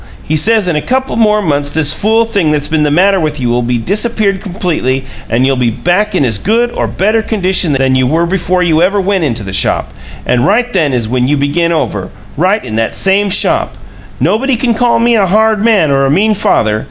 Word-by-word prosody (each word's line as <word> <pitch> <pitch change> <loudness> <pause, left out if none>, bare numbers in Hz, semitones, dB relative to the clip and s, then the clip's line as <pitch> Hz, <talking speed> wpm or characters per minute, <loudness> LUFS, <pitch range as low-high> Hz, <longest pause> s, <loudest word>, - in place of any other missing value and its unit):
He 155 - -2
says 210 +5 +2
in 175 - 0
a 150 - 0
couple 260 - -2
more 210 -2 +2
months 145 -4 -1
this 150 0 +2
fool 220 +5 +1
thing 200 -8 -1
that's 150 -1 0
been 160 -1 -1
the 150 - +1
matter 190 +6 +2
with 155 -3 -3
you'll 120 -1 0
be 120 0 -1
disappeared 200 - -1
completely 170 - -2 0.2
and 120 +3 +1
you'll 135 0 +1
be 125 -2 +1
back 180 - -1
in 145 - +2
as 110 -5 -1
good 235 - 0
or - - -2
better 215 +4 0
condition 185 -7 0
than 135 -1 +1
you 130 -1 +1
were 165 +5 +1
before 180 0 -1
you 165 -2 +1
ever 195 +3 +1
went 195 -2 0
into 120 -7 -2
the 95 -1 -7
shop. 95 - 0 0.3
And 120 -1 +1
right 240 - +1
then 160 -7 +1
is 120 -4 -1
when 125 +2 -1
you 145 +2 +1
begin 155 +5 0
over 105 - -2 0.3
right 190 +7 0
in 110 -2 -5
that 115 - -2
same 195 +1 +1
shop! - - +1 0.4
Nobody 220 - 0
can 235 0 0
call 235 +1 +1
me 235 0 +2
a 195 -2 +2
hard 215 +2 +1
man 205 -10 +2
or 135 0 +2
a - - -1
mean 205 +9 +2
father. 110 - 0
175 Hz, 225 wpm, -11 LUFS, 135-210 Hz, 0.4 s, says